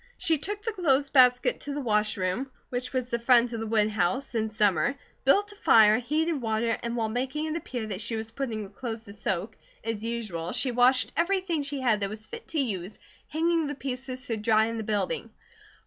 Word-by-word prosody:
She 320 Hz, -3 st, +1 dB
took 415 Hz, +6 st, -4 dB
the 450 Hz, -, -1 dB
clothes 285 Hz, -8 st, +1 dB
basket 250 Hz, -2 st, +5 dB
to 285 Hz, -1 st, -5 dB
the -, -, -2 dB
wash 215 Hz, -4 st, +1 dB
room, 190 Hz, +9 st, -1 dB, 0.2 s
which 250 Hz, 0 st, -3 dB
was 255 Hz, -1 st, -2 dB
the 235 Hz, -, 0 dB
front 240 Hz, 0 st, +4 dB
of 230 Hz, -, -3 dB
the 225 Hz, -, -3 dB
woodhouse, 215 Hz, +2 st, +1 dB
in 220 Hz, -1 st, 0 dB
summer; 210 Hz, -, +2 dB, 0.3 s
built 405 Hz, +10 st, +4 dB
a -, -, -12 dB
fire, 220 Hz, -, +6 dB
heated 305 Hz, +4 st, 0 dB
water, 225 Hz, 0 st, 0 dB
and 235 Hz, 0 st, -3 dB
while 225 Hz, -2 st, 0 dB
making 260 Hz, +7 st, -2 dB
it 315 Hz, 0 st, -2 dB
appear 255 Hz, -8 st, -4 dB
that 205 Hz, -2 st, -4 dB
she 230 Hz, +1 st, -2 dB
was 220 Hz, 0 st, -4 dB
putting 230 Hz, -5 st, -3 dB
the 195 Hz, -, -10 dB
clothes 225 Hz, 0 st, -5 dB
to 200 Hz, -, -10 dB
soak, 205 Hz, 0 st, -3 dB, 0.3 s
as 225 Hz, -1 st, -3 dB
usual, 215 Hz, -8 st, -3 dB
she 260 Hz, -, +2 dB
washed 250 Hz, +2 st, +4 dB
everything 350 Hz, -2 st, +1 dB
she 280 Hz, -1 st, -4 dB
had 235 Hz, -5 st, +2 dB
that 200 Hz, -1 st, -1 dB
was 215 Hz, +1 st, -7 dB
fit 465 Hz, 0 st, -9 dB
to 320 Hz, -, -1 dB
use, 205 Hz, -6 st, -2 dB, 0.3 s
hanging 330 Hz, 0 st, +1 dB
the 290 Hz, -, -4 dB
pieces 255 Hz, -1 st, -5 dB
to 225 Hz, -, -2 dB
dry 220 Hz, 0 st, +3 dB
in 230 Hz, 0 st, -3 dB
the 220 Hz, -, -3 dB
building. 215 Hz, -, -2 dB
235 Hz, 210 wpm, -27 LUFS, 215-280 Hz, 0.3 s, fire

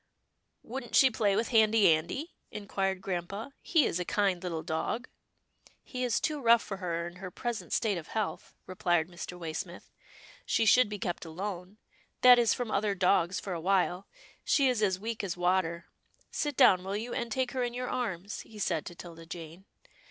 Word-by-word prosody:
"Wouldn't 240 Hz, 0 st, -5 dB
she 265 Hz, -1 st, +7 dB
play 205 Hz, -3 st, +1 dB
with 225 Hz, +3 st, 0 dB
Handy 220 Hz, -2 st, +5 dB
Andy?" 175 Hz, -, -3 dB, 0.2 s
in 205 Hz, -1 st, -8 dB
quired 195 Hz, -2 st, -1 dB
grampa, 195 Hz, +8 st, -4 dB
" -, -, -43 dB
he 320 Hz, -5 st, +6 dB
is 170 Hz, -, -1 dB
a -, -, 0 dB
kind 195 Hz, -1 st, +1 dB
little 170 Hz, -3 st, -4 dB
dog." 190 Hz, +10 st, -2 dB, 0.4 s
" -, -, -48 dB, 0.3 s
He 255 Hz, -1 st, -5 dB
is 245 Hz, -3 st, +1 dB
too 300 Hz, -2 st, -2 dB
rough 235 Hz, -1 st, +5 dB
for 195 Hz, -, -5 dB
her 170 Hz, -3 st, -2 dB
in 175 Hz, +1 st, -10 dB
her 185 Hz, 0 st, -7 dB
present 240 Hz, +4 st, -5 dB
state 205 Hz, -5 st, +1 dB
of 155 Hz, -, -11 dB
health," 215 Hz, -3 st, -4 dB
replied 175 Hz, -3 st, 0 dB
Mr. 175 Hz, 0 st, -7 dB
Waysmith, 170 Hz, +2 st, -6 dB, 0.3 s
" -, -, -20 dB, 0.2 s
she 225 Hz, -, +2 dB
should 240 Hz, +1 st, +6 dB
be 210 Hz, -, -4 dB
kept 175 Hz, -3 st, -3 dB
alone 180 Hz, +3 st, -6 dB, 0.2 s
— -, -, -38 dB
that 250 Hz, -1 st, +9 dB
is 235 Hz, -2 st, +3 dB
from 245 Hz, -3 st, -2 dB
other 205 Hz, 0 st, +1 dB
dogs 185 Hz, 0 st, +2 dB
for 195 Hz, -, -5 dB
a 170 Hz, -, -4 dB
while. 185 Hz, 0 st, +1 dB, 0.4 s
She 275 Hz, -2 st, +3 dB
is 250 Hz, -4 st, +1 dB
as 190 Hz, -3 st, +2 dB
weak 225 Hz, +1 st, -4 dB
as 180 Hz, -3 st, -3 dB
water 175 Hz, -1 st, +1 dB, 0.2 s
— -, -, -39 dB
Sit 295 Hz, -3 st, -2 dB
down, 185 Hz, -1 st, +6 dB
will 195 Hz, +2 st, -2 dB
you, 235 Hz, +3 st, -5 dB
and 235 Hz, -3 st, -3 dB
take 255 Hz, +1 st, 0 dB
her 260 Hz, -, -2 dB
in 240 Hz, -1 st, -2 dB
your 250 Hz, 0 st, -3 dB
arms," 205 Hz, -7 st, -3 dB
he 220 Hz, -, -14 dB
said 165 Hz, -6 st, -1 dB
to 175 Hz, -, -8 dB
'Tilda 165 Hz, -1 st, -11 dB
Jane. 170 Hz, +2 st, -9 dB
195 Hz, 205 wpm, -30 LUFS, 175-230 Hz, 0.4 s, that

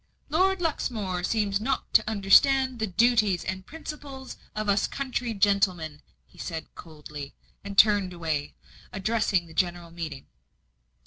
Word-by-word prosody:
"Lord 375 Hz, +4 st, +2 dB
Luxmore 215 Hz, -, -2 dB
seems 205 Hz, 0 st, +1 dB
not 265 Hz, +5 st, -2 dB
to -, -, +4 dB
understand 255 Hz, +5 st, +4 dB
the 220 Hz, -, 0 dB
duties 215 Hz, -2 st, +3 dB
and 185 Hz, 0 st, -4 dB
principles 290 Hz, -4 st, -8 dB, 0.2 s
of 215 Hz, 0 st, -2 dB
us 200 Hz, 0 st, +2 dB
country 255 Hz, -3 st, -3 dB
gentlemen," 185 Hz, -7 st, +1 dB, 0.2 s
he -, -, -21 dB
said 160 Hz, -2 st, -6 dB
coldly, 150 Hz, -3 st, -10 dB, 0.3 s
and 200 Hz, 0 st, -7 dB
turned 205 Hz, -3 st, +5 dB
away, 160 Hz, -4 st, -3 dB, 0.4 s
addressing 200 Hz, -2 st, 0 dB
the 165 Hz, -, -14 dB
general 175 Hz, 0 st, -1 dB
meeting. 160 Hz, -5 st, -6 dB
200 Hz, 130 wpm, -27 LUFS, 175-240 Hz, 0.4 s, turned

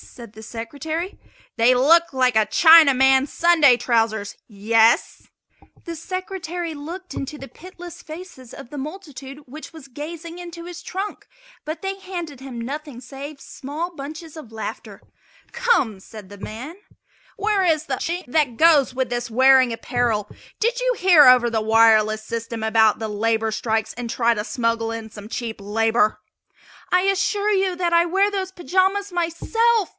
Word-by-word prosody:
said 235 Hz, -4 st, -13 dB
the 220 Hz, -, -12 dB
Secretary. 295 Hz, -, -5 dB, 0.4 s
"They 235 Hz, +2 st, +5 dB
look 330 Hz, +7 st, +4 dB
like 255 Hz, -3 st, +1 dB
a 220 Hz, -1 st, +4 dB
Chinaman's 275 Hz, -2 st, +6 dB
Sunday 320 Hz, -7 st, +4 dB
trousers 225 Hz, -4 st, 0 dB
yes?" 225 Hz, +2 st, +1 dB, 0.6 s
The 335 Hz, -1 st, -6 dB
Secretary 355 Hz, -1 st, -5 dB
looked 335 Hz, +4 st, -8 dB
into 275 Hz, +2 st, -6 dB
the 275 Hz, -, -9 dB
pitiless 355 Hz, +1 st, -12 dB
faces 310 Hz, -6 st, -11 dB
of 240 Hz, -, -11 dB
the 295 Hz, -, -7 dB
multitude 285 Hz, -3 st, -8 dB
which 300 Hz, +5 st, -11 dB
was 315 Hz, -4 st, -13 dB
gazing 330 Hz, +5 st, -8 dB
into 340 Hz, -1 st, -9 dB
his 355 Hz, 0 st, -9 dB
trunk, 390 Hz, +3 st, -6 dB, 0.4 s
but 310 Hz, +2 st, -5 dB
they 390 Hz, 0 st, -3 dB
handed 345 Hz, -7 st, -7 dB
him 260 Hz, -3 st, -8 dB
nothing 280 Hz, +1 st, -6 dB
save 275 Hz, +3 st, -9 dB
small 315 Hz, +7 st, -6 dB
bunches 310 Hz, +3 st, -9 dB
of 300 Hz, -8 st, -11 dB
laughter. 220 Hz, -1 st, -7 dB, 0.5 s
"Come!" 265 Hz, -, +1 dB
said 210 Hz, -1 st, -12 dB
the 205 Hz, -, -11 dB
man, 245 Hz, -, -8 dB, 0.6 s
"where 405 Hz, -1 st, +1 dB
is 315 Hz, -3 st, +1 dB
the 275 Hz, -, -2 dB
Chink 345 Hz, +7 st, -4 dB
that 250 Hz, -3 st, 0 dB
goes 305 Hz, -6 st, +4 dB
with 260 Hz, -2 st, -1 dB
this 240 Hz, -1 st, -4 dB
wearing 260 Hz, +1 st, +5 dB
apparel? 230 Hz, -3 st, -1 dB, 0.3 s
Did 475 Hz, +3 st, 0 dB
you -, -, +1 dB
hear 350 Hz, -6 st, +6 dB
over 250 Hz, -1 st, +6 dB
the 225 Hz, -1 st, -1 dB
wireless 220 Hz, -1 st, +4 dB
system 230 Hz, 0 st, -5 dB
about 220 Hz, -1 st, +3 dB
the 220 Hz, -, -3 dB
labor 220 Hz, +1 st, 0 dB
strikes 220 Hz, 0 st, -2 dB
and 245 Hz, -1 st, -6 dB
try 235 Hz, 0 st, +2 dB
to 210 Hz, -2 st, -3 dB
smuggle 230 Hz, -1 st, -1 dB
in 225 Hz, -1 st, -6 dB
some 205 Hz, 0 st, -11 dB
cheap 225 Hz, -3 st, -5 dB
labor?" 215 Hz, +1 st, +1 dB, 0.7 s
"I 365 Hz, -, +4 dB
assure 390 Hz, +2 st, 0 dB
you 380 Hz, -2 st, +1 dB
that 350 Hz, -1 st, 0 dB
I 340 Hz, 0 st, +5 dB
wear 385 Hz, +4 st, +2 dB
those 385 Hz, -2 st, -4 dB
pajamas 380 Hz, +2 st, 0 dB
myself!" 395 Hz, +5 st, +1 dB
275 Hz, 160 wpm, -22 LUFS, 230-345 Hz, 0.7 s, Chinaman's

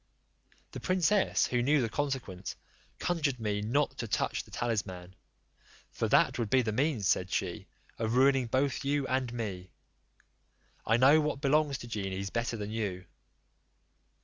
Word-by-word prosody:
The -, -, -6 dB
princess, 185 Hz, +2 st, +2 dB
who 125 Hz, -1 st, 0 dB
knew 145 Hz, +4 st, +3 dB
the 120 Hz, -, +1 dB
consequence, 125 Hz, -8 st, -3 dB, 0.4 s
conjured 150 Hz, -7 st, -1 dB
me 105 Hz, -2 st, -1 dB
not 135 Hz, +8 st, 0 dB
to 115 Hz, -, -3 dB
touch -, -, -1 dB
the -, -, -19 dB
talisman. 95 Hz, -6 st, -3 dB, 0.8 s
"For -, -, -1 dB
that -, -, +3 dB
would 115 Hz, -3 st, -1 dB
be 130 Hz, +2 st, +4 dB
the 110 Hz, -, -1 dB
means," 125 Hz, -3 st, 0 dB
said 90 Hz, 0 st, +1 dB
she, -, -, -2 dB, 0.3 s
"of 115 Hz, +1 st, -1 dB
ruining 135 Hz, -1 st, +4 dB
both 135 Hz, +4 st, 0 dB
you 140 Hz, 0 st, 0 dB
and 130 Hz, -2 st, -1 dB
me; 100 Hz, -6 st, -5 dB, 1.2 s
I 115 Hz, -, +4 dB
know 140 Hz, +5 st, +6 dB
what 150 Hz, -2 st, -2 dB
belongs 145 Hz, 0 st, +2 dB
to 120 Hz, -, -9 dB
genies 95 Hz, -3 st, -4 dB
better 115 Hz, 0 st, -2 dB
than 105 Hz, 0 st, -5 dB
you." 100 Hz, -5 st, -3 dB
120 Hz, 150 wpm, -30 LUFS, 105-140 Hz, 1.2 s, know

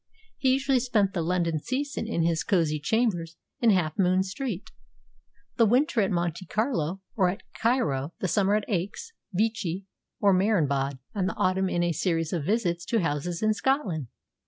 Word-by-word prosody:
He 260 Hz, -1 st, +3 dB
usually 270 Hz, -1 st, +2 dB
spent 215 Hz, -6 st, +1 dB
the 175 Hz, -, -1 dB
London 170 Hz, -1 st, 0 dB
season 270 Hz, -, -3 dB
in 170 Hz, -7 st, 0 dB
his 165 Hz, -1 st, +1 dB
cosy 160 Hz, -6 st, +1 dB
chambers 175 Hz, -2 st, 0 dB, 0.2 s
in 235 Hz, -, +4 dB
Half 175 Hz, -6 st, +1 dB
Moon 185 Hz, 0 st, +3 dB
Street; 195 Hz, +1 st, -5 dB, 0.9 s
the 230 Hz, -, +6 dB
winter 255 Hz, +2 st, +3 dB
at 195 Hz, -, +1 dB
Monte 175 Hz, -1 st, -1 dB
Carlo 195 Hz, -, -1 dB
or 185 Hz, -4 st, +3 dB
at 195 Hz, +4 st, -5 dB
Cairo; 165 Hz, -, 0 dB
the 185 Hz, -, -2 dB
summer 200 Hz, +3 st, +2 dB
at 215 Hz, -, 0 dB
Aix, 210 Hz, -, -3 dB, 0.2 s
Vichy, 200 Hz, -2 st, -1 dB, 0.3 s
or 200 Hz, -1 st, +4 dB
Marienbad; 145 Hz, -9 st, +1 dB, 0.2 s
and 190 Hz, -3 st, 0 dB
the -, -, -5 dB
autumn 185 Hz, +1 st, +1 dB
in 175 Hz, -1 st, 0 dB
a 175 Hz, -, +1 dB
series 165 Hz, 0 st, -1 dB
of 160 Hz, -5 st, -1 dB
visits 180 Hz, -5 st, 0 dB
to 230 Hz, -3 st, +1 dB
houses 165 Hz, +3 st, -2 dB
in 215 Hz, 0 st, +4 dB
Scotland. 210 Hz, -, 0 dB
190 Hz, 170 wpm, -27 LUFS, 170-225 Hz, 0.9 s, the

